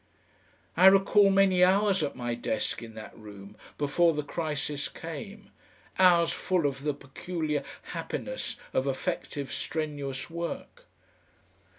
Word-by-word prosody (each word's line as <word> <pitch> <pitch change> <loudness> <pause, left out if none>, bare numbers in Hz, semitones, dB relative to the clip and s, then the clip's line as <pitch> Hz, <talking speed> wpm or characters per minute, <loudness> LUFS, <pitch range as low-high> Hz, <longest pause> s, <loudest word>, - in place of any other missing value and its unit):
I 185 +3 +7
recall 195 +1 +6
many 195 -2 +4
hours 195 +1 +4
at 145 - -2
my 120 -1 -3
desk 115 -1 -2
in 115 -1 -10
that 110 - -9
room 100 -1 -12 0.2
before 155 +3 +2
the 150 - -1
crisis 150 -2 -3
came, 195 +6 -8 0.5
hours 175 -3 +6
full 180 -4 0
of 135 -1 -1
the 145 0 -1
peculiar 150 +2 -3 0.2
happiness - - -4 0.2
of 130 - +1
effective 135 +1 -3
strenuous 145 -4 -3
work. 170 - -6
155 Hz, 120 wpm, -28 LUFS, 135-185 Hz, 0.5 s, I